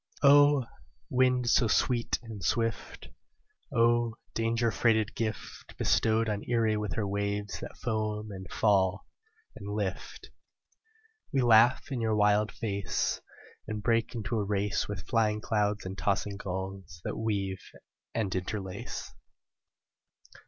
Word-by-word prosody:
O! 145 -1 +6 0.5
wind 125 -1 +3
so 120 0 +4
sweet 120 +2 +1
and 110 -4 -8
swift, 115 -1 -2 0.6
O! 120 -1 +2 0.2
danger 115 +1 +1
freighted 110 -2 +2
gift 110 -2 -5
Bestowed 110 0 +2
on 105 -1 -1
Erie 115 -2 +2
with 105 -1 -2
her 110 - -1
waves 100 0 -2
that - - -8
foam 110 -1 -2
and 95 -2 -9
fall 100 -2 +2 0.5
and 100 -1 -8
lift, 100 -3 -4 1.0
We 135 -3 +2
laugh 120 +3 +5
in 125 -3 -2
your 110 -1 +1
wild 105 0 +3
face, 100 -3 -2 0.5
And 105 -1 -4
break 115 +1 +1
into 110 0 -2
a - - 0
race 100 -2 -1
With 105 -1 -6
flying 110 -3 +2
clouds 105 -2 0
and 95 +1 -5
tossing 100 0 -1
gulls 95 -2 -6
that - - -3
weave 100 -4 -2 0.5
and 105 -5 -1
interlace. 95 0 -5
110 Hz, 125 wpm, -29 LUFS, 100-115 Hz, 1.0 s, O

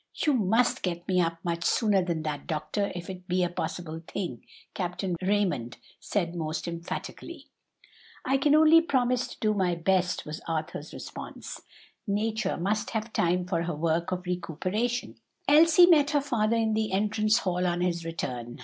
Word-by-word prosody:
"You 300 - +1
must 225 +1 +2
get 175 -1 -3
me 185 -1 +3
up 165 -1 0
much 170 -1 -2
sooner 205 -2 +3
than 170 -3 -2
that, 150 -2 -4
doctor, 155 +6 -2
if 175 0 -6
it 185 -1 -8
be 180 0 +1
a 175 - +1
possible 165 -2 -4
thing," 170 - -4 0.3
Captain 180 -1 -2
Raymond 185 - 0 0.2
said 175 -5 -1
most 160 -1 -3
emphatically. 170 0 -6 0.8
"I 270 +1 +3
can 290 +2 +4
only 315 +1 +7
promise 250 -5 +1
to - - -11
do 215 -1 +2
my 185 -4 +1
best," 180 +1 +1
was 150 +1 -6
Arthur's 160 -1 -4
response. - - -8 0.5
"Nature 215 0 0
must 205 +5 -1
have 220 0 -3
time 180 +1 +1
for 175 -2 -1
her 170 -1 -2
work 165 +2 0
of 180 0 -3
recuperation." 185 +7 -2 0.3
Elsie 320 +3 +7
met 305 -5 +5
her 290 -2 +2
father 230 -5 +1
in 220 -1 +1
the 220 0 0
entrance 215 +2 +2
hall 180 -4 0
on 175 0 0
his 170 -1 0
return. 125 -7 -5
185 Hz, 165 wpm, -28 LUFS, 170-220 Hz, 0.8 s, only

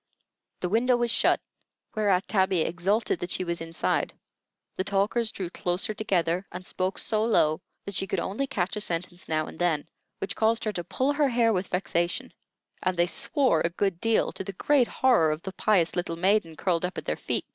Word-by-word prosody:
The 180 - -1
window 240 +5 +3
was 240 -1 0
shut, - - +3 0.5
whereat 200 -4 +2
Tabby 190 -4 +2
exulted 185 +5 0
that 175 - -4
she 185 - +1
was 170 -2 -3
inside; 165 0 -1 0.6
the 185 - -1
talkers 200 +4 +1
drew 185 -5 -5
closer 180 +5 -1
together, 185 -3 0
and 180 +1 -7
spoke 185 +1 -2
so 215 -1 0
low 155 -9 +3 0.2
that 200 - -5
she 195 - -1
could - - -1
only 250 +9 -2
catch 190 -5 -1
a 210 - -2
sentence 175 -1 -4
now 155 -1 +1
and - - -10
then, 165 -4 +1 0.3
which 200 +3 -4
caused 225 +1 +2
her 215 - -1
to 175 - -3
pull 265 +10 0
her 290 -1 +2
hair 235 -2 +3
with 185 -1 -1
vexation; 175 -1 -1 0.5
and 185 -1 0
they 175 - +4
swore 270 - +1
a 170 - +1
good 180 0 -1
deal, 225 -1 +2
to - - -5
the 195 +1 -6
great 265 +5 +3
horror 245 -12 +3
of 155 +2 -2
the 190 - -6
pious 185 -6 +2
little 175 -2 -1
maiden 185 -2 +2
curled 170 +1 0
up 180 +1 -3
at - - -5
their - - 0
feet. - - -2
190 Hz, 200 wpm, -27 LUFS, 175-220 Hz, 0.6 s, they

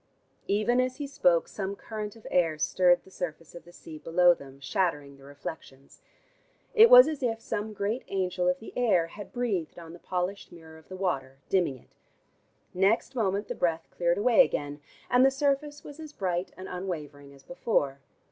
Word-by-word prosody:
Even 215 +5 +2
as 255 0 -2
he 290 - -5
spoke 180 -11 +2
some 200 -1 -4
current 215 0 -6
of 225 - -17
air 165 -3 +2
stirred 175 +3 +3
the 190 - -18
surface 165 -3 -6
of 170 - -11
the 175 - -15
sea 160 -3 -11
below 175 +2 +4
them, 140 -4 -13
shattering 145 -1 -1
the 135 - -18
reflections. 140 -1 -10 0.7
It 450 +1 +8
was - - +10
as 310 -3 -4
if 230 -3 -1
some 215 -1 -4
great 210 +4 -2
angel 185 -2 -1
of 180 0 +2
the 220 - -11
air 205 -9 +3
had 200 +5 -10
breathed 215 -12 -2
on 165 -1 -10
the 175 - -12
polished 180 +3 -4
mirror 160 -2 -13
of 160 - -23
the 185 - -8
water, 135 -8 -2
dimming 175 -9 +1
it. - - -24 0.8
Next 195 +8 +2
moment 205 -4 -1
the - - -3
breath 165 -2 -1
cleared 170 0 0
away 240 +5 +6
again, 145 - -4 0.3
and 250 +1 +4
the 270 - +7
surface 285 +2 -1
was 290 +1 -11
as 310 -2 -9
bright 180 -2 -2
and 185 - -8
unwavering 150 -6 -6
as 140 -1 -17
before. 145 -5 -1
180 Hz, 185 wpm, -28 LUFS, 165-225 Hz, 0.8 s, was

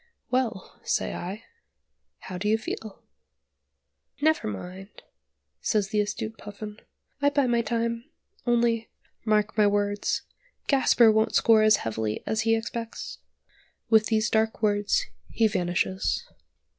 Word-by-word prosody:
"Well," 245 -7 -1
say - - 0
I, 195 +6 -6 0.8
"how 185 -1 -6
do 210 - -2
you 220 - +4
feel?" 220 -1 -7 1.2
"Never 315 +1 +2
mind," 180 - -8 0.6
says 205 -3 0
the 210 0 +2
astute 220 +2 -4
Puffin; 210 0 -8 0.4
"I 285 - +5
bide 280 -4 +2
my 235 -1 +3
time! 235 0 -2 0.4
Only 235 -1 +2 0.4
(mark 215 0 +2
my 210 -2 +5
words), 205 0 0 0.4
Gasper 250 -4 +5
won't 220 0 +2
score 225 -1 +5
as 215 -1 +6
heavily 110 -1 -2
as 220 0 0
he 225 +1 +3
expects." 225 +1 -5 0.7
With 220 -1 +5
these 215 -1 +1
dark 220 0 +1
words 205 - +2 0.2
he 225 - +3
vanishes. 100 - -1
215 Hz, 125 wpm, -26 LUFS, 205-230 Hz, 1.2 s, as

